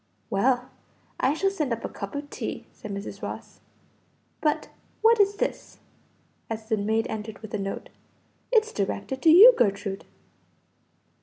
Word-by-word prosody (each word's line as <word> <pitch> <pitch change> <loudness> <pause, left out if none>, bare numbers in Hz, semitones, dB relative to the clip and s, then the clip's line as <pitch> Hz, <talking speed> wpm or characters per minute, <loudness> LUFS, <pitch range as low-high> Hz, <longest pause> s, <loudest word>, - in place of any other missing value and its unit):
"Well, 245 +5 +1 0.5
I 275 +3 +2
shall 390 +4 +1
send 305 -9 -2
up 230 0 -2
a - - -1
cup 200 +3 -7
of 285 0 -4
tea," - - -5
said 215 - -10
Mrs. 200 0 -6
Ross. - - -7 0.8
"But, 300 -1 0 0.3
what 455 0 +6
is 405 0 +4
this?" - - -3 0.7
as 220 -1 -5
the 220 - +3
maid 220 +2 0
entered 220 0 -6
with 220 - -9
a 210 - -1
note. 195 0 -5 0.6
"It's 445 -2 +3
directed 205 +6 -3
to 325 - +5
you, 405 +10 +10
Gertrude." 200 -2 0
230 Hz, 150 wpm, -26 LUFS, 205-320 Hz, 0.8 s, you